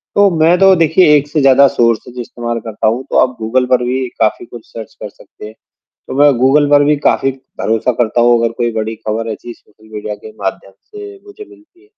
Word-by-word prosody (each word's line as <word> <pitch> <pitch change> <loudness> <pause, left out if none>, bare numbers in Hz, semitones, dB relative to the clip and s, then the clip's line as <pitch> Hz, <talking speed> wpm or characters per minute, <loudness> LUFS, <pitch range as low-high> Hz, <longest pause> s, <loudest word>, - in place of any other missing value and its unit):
तो 205 0 +4
मैं 170 +3 +4
तो 195 0 +6
देखिए 165 -1 +3
एक 145 +1 -3
से 150 0 -1
ज़्यादा 135 +1 +5
सोर्सेज़ 120 +1 -1
इस्तेमाल 120 0 -5
करता 110 -1 -3
हूँ, 120 +4 -1
तो - - 0
आप 125 -1 +1
गूगल 125 +4 0
पर 125 -1 +1
भी 130 +1 -2
काफ़ी 110 +2 0
कुछ 120 -2 -13
सर्च 110 -2 -9
कर - - -6
सकते - - -15
हैं, 110 - -12 0.5
तो - - -6
मैं 145 0 +6
गूगल 145 +3 +2
पर 145 0 +4
भी 150 +1 +2
काफ़ी 135 - +1 0.3
भरोसा 115 +3 0
करता 120 +1 0
हूँ 120 0 +4
अगर 115 0 0
कोई 120 -1 -1
बड़ी 110 0 -4
खबर 110 +1 -4
ऐसी 120 +2 -10
सोशल 110 0 -24
मीडिया 105 0 -6
के 110 - -13
माध्यम 95 0 -5
से 410 - -12
मुझे 410 +1 -12
मिलती 355 -1 -22
है। 410 - -25
125 Hz, 220 wpm, -14 LUFS, 115-150 Hz, 0.5 s, तो